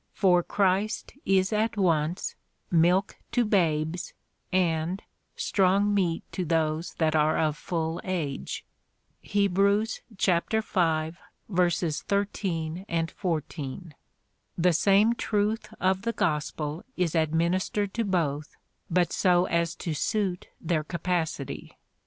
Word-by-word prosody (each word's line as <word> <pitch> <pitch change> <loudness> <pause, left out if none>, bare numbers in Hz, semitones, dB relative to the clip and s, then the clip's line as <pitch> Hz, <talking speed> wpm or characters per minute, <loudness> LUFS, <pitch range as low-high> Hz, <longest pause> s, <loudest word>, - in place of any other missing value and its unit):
For 180 -3 +4
Christ 200 +3 0
is 190 +1 +3
at 215 0 0
once 170 -2 +1 0.4
milk 175 +3 +3 0.2
to 245 -1 +3
babes, 170 -4 0 0.4
and 175 0 +1 0.4
strong 200 +1 +2
meat 175 -5 +1
to 185 - -2
those 160 0 0
that 160 -1 +1
are 155 0 +3
of 155 -2 +1
full 165 0 -3
age, 160 -7 -3 0.6
(Heb. 200 -3 +1
v. 200 +2 +4 2.0
13, 180 0 -2 0.3
14,) 155 -2 -4 0.6
the 180 0 +3
same 200 +6 +4
truth 215 -1 -1
of 190 +1 +2
the 230 +3 -1
gospel 155 -4 -1
is 180 -3 +1
administered 170 +5 +1
to 230 - 0
both, 160 -7 -1 0.3
but 175 -1 +2
so 180 -1 +3
as 170 -1 0
to 165 - -3
suit 185 +3 -1
their 160 -2 0
capa 170 +1 -1
city. 140 -3 -7
180 Hz, 110 wpm, -27 LUFS, 160-195 Hz, 2.0 s, For